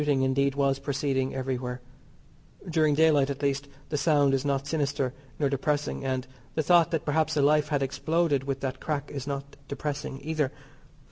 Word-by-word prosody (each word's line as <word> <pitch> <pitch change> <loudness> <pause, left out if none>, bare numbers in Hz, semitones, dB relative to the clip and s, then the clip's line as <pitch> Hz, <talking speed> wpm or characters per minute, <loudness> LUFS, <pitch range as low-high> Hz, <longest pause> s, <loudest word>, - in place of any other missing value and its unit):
Shooting, 145 -3 +2
indeed, 135 +1 +2
was 140 -1 +2
proceeding 135 -1 -1
everywhere. 125 -1 -3 0.9
During 155 -3 +3
daylight, 150 -3 +4
at 140 +1 -4
least, 140 0 0 0.2
the 150 - -1
sound 145 -2 +3
is 135 -1 +1
not 140 -1 0
sinister 140 -3 -1 0.2
nor 145 - +2
depressing, 145 +1 -1
and 130 -1 -1 0.3
the 155 - +1
thought 170 +1 +5
that 165 -3 -2
perhaps 155 +1 +1
a - - +4
life 150 +1 +4
had 145 -2 0
exploded 150 0 0
with 135 -1 -2
that 130 -1 -3
crack 145 -2 -3
is 140 -1 -5
not 140 0 -5
depressing 140 -1 -4
either. 155 -3 0
140 Hz, 175 wpm, -28 LUFS, 135-150 Hz, 0.9 s, thought